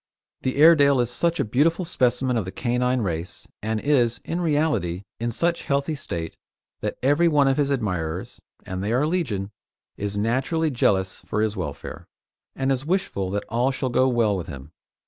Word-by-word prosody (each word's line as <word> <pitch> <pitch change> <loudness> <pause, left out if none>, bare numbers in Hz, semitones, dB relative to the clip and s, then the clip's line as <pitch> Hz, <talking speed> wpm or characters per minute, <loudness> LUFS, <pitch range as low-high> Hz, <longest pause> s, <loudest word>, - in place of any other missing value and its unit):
The 130 - -1
Airedale 145 -3 +6
is 120 -1 0
such 170 +6 0
a - - +2
beautiful 160 - +2
specimen 130 -5 +1
of 110 -5 0
the 95 - -5
canine 125 +1 0
race, 85 -3 -4
and 110 +1 -1
is, 125 -3 +2
in 170 +2 -2
reality, 145 - 0 0.2
in 120 +1 -1
such 170 +8 -1
healthy 140 +2 0
state, 85 - -5 0.4
that - - -3
every 145 +6 +4
one 145 -4 +4
of 135 - +2
his 145 -2 +2
admirers 90 - -2 0.2
and 95 +1 -4
they 105 +3 0
are 130 +5 +2
legion 115 - -1 0.5
is 100 0 -3
naturally 135 +9 0
jealous 95 -6 +1
for 105 - -1
his 110 -1 0
welfare, 80 -7 -6 0.5
and 135 0 0
is 130 -1 0
wishful 155 - -1
that 100 +2 -2
all 120 +3 +1
shall 135 -1 -2
go 130 +1 +3
well 115 -5 +2
with 90 -4 -4
him. 70 0 -9
125 Hz, 180 wpm, -24 LUFS, 100-145 Hz, 0.5 s, Airedale